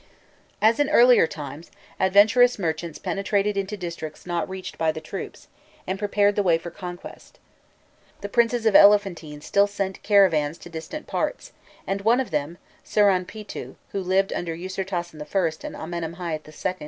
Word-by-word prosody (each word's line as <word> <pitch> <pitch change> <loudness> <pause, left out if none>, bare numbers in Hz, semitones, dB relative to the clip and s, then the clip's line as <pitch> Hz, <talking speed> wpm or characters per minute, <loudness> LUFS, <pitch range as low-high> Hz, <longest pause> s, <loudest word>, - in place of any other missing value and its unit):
As 225 +3 +4
in 290 -1 +2
earlier 245 - +6
times, 150 +1 -8 0.3
adventurous 210 +6 +5
merchants 165 -3 -3
penetrated 200 +1 -1
into 200 +1 -3
districts 170 -4 -7
not 175 0 -2
reached 190 0 -7
by 160 -1 +2
the 160 - -6
troops, 155 - -8 0.4
and 190 +1 -3
prepared 205 0 +2
the 205 - +2
way 175 -4 +3
for 170 +1 -8
conquest. 175 0 -10 0.8
The 205 - -4
princes 235 +2 +1
of 220 - +3
Elephantine 190 -8 +4
still 200 +6 +2
sent 195 -2 -4
caravans 170 -7 +3
to - - -12
distant 165 - -7
parts, - - -3 0.3
and 195 0 -2
one 230 +5 +3
of 260 - -3
them, 150 +2 -2 0.3
Siranpîtû, 205 +1 0 0.2
who 195 - -2
lived 190 +1 +1
under 165 -2 -3
Ûsirtasen 180 -3 -4
I. 160 +1 -2
and - - -8
Amenemhâit 165 -1 -5 0.2
II. 185 -1 0
190 Hz, 155 wpm, -24 LUFS, 165-205 Hz, 0.8 s, earlier